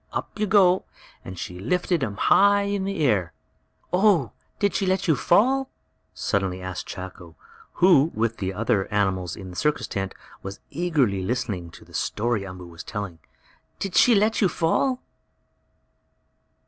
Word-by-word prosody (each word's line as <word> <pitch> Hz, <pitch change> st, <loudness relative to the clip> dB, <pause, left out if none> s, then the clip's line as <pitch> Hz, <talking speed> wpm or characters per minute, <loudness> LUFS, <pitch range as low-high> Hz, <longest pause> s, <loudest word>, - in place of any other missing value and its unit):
"Up -, -, -5 dB
you 210 Hz, -, +1 dB
go!" 190 Hz, -2 st, +4 dB, 0.4 s
and 95 Hz, 0 st, -8 dB
she 90 Hz, +1 st, -6 dB
lifted 175 Hz, -, 0 dB
him 105 Hz, -6 st, -2 dB
high 200 Hz, -, +4 dB
in 200 Hz, -1 st, -1 dB
the 195 Hz, -6 st, -1 dB
air. 100 Hz, -, +1 dB, 0.6 s
"Oh, 180 Hz, -, +3 dB, 0.3 s
did 200 Hz, -1 st, +1 dB
she 195 Hz, -, 0 dB
let 190 Hz, +1 st, +1 dB
you 160 Hz, -, +4 dB
fall?" 260 Hz, -, +3 dB, 0.4 s
suddenly 95 Hz, -2 st, -1 dB
asked 95 Hz, 0 st, -6 dB
Chako, 90 Hz, -3 st, -9 dB, 0.4 s
who, 170 Hz, -5 st, +5 dB
with 115 Hz, +1 st, 0 dB
the 95 Hz, -1 st, -2 dB
other 105 Hz, 0 st, 0 dB
animals 95 Hz, -4 st, 0 dB
in 95 Hz, -2 st, -9 dB
the -, -, -11 dB
circus 150 Hz, +6 st, 0 dB
tent, 95 Hz, -1 st, -4 dB, 0.3 s
was 95 Hz, +1 st, -7 dB
eagerly 140 Hz, -, +1 dB
listening 95 Hz, -5 st, -2 dB
to -, -, -15 dB
the -, -, -19 dB
story 115 Hz, -1 st, -1 dB
Umboo 90 Hz, -2 st, -8 dB
was 85 Hz, -1 st, -10 dB
telling. 100 Hz, -6 st, -6 dB, 0.6 s
"Did 195 Hz, -2 st, -4 dB
she 235 Hz, +6 st, +6 dB
let 215 Hz, +3 st, +2 dB
you 195 Hz, -, +4 dB
fall?" 250 Hz, +12 st, 0 dB
120 Hz, 155 wpm, -24 LUFS, -, 0.6 s, she